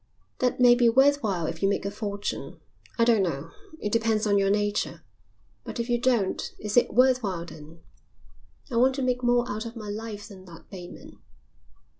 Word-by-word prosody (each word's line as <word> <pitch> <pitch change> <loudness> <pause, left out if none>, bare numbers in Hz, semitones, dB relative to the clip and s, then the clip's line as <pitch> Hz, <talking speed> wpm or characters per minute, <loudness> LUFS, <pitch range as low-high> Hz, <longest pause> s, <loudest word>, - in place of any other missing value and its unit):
That 250 -1 0
may 245 -1 +7
be 240 -1 +4
worth 280 +4 +4
while 190 -7 -1
if 165 +1 -5
you 195 - +3
make 200 - -1
a 200 - -2
fortune; 205 -1 -5 0.4
I 230 - +4
don't 230 -3 +4
know, 165 -3 -3 0.3
it 210 - -3
depends 225 -1 +1
on 205 -1 +3
your 195 0 +2
nature; 205 0 -1 0.6
but - - -7
if 235 +1 -3
you 240 0 +2
don't, 235 -6 +1 0.2
is 210 -1 -4
it 245 - +4
worth 255 +1 +5
while 185 -6 -3
then? 160 0 -13 0.9
I 235 - -1
want 260 +2 +4
to 270 - -2
make 250 -1 0
more 245 0 +2
out 220 0 -4
of 230 - -9
my 215 -3 -7
life 210 0 -6
than 190 -3 -13
that, 170 -2 -15
Bateman." 180 -3 -11
215 Hz, 195 wpm, -26 LUFS, 195-240 Hz, 0.9 s, may